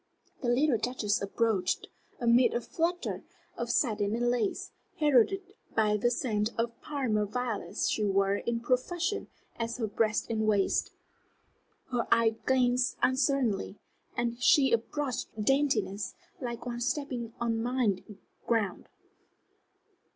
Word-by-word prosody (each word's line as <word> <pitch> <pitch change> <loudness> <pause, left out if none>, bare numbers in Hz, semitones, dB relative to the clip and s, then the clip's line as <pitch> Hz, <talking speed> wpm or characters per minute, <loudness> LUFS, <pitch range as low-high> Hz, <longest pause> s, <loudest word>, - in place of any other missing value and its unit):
The 245 - 0
little 250 -1 +3
Duchess 225 -4 0
approached, 200 -2 0 0.3
amid 240 +1 +4
a 240 - +1
flutter 340 +8 -2 0.3
of - - -4
satin 210 -4 +1
and 240 +1 +1
lace, 235 -4 -1 0.3
heralded 310 - +3 0.2
by 215 -1 +3
the 220 +3 +2
scent 225 -4 0
of 230 +1 +1
the 235 - -27
Parma 245 -8 -1
violets 220 -5 -2
she 215 - 0
wore 195 0 +2
in 235 +1 -2
profusion 345 - 0 0.3
at 230 0 -2
her 235 - -1
breast 215 +1 0
and 220 -1 0
waist. 205 -2 +2 1.0
Her 245 -2 0
eye 230 -1 +4
glanced 250 -1 +2
uncertainly, 260 -7 +1 0.4
and 235 0 -1
she 270 +2 +5
approached 255 +3 -1
with 210 -1 -3
daintiness, 270 -7 +1 0.2
like 240 -4 -5
one 240 -1 -4
stepping 245 -3 -2
on 230 -1 0
mined 225 -5 -1 0.3
ground. 215 -6 0
235 Hz, 130 wpm, -30 LUFS, 215-255 Hz, 1.0 s, she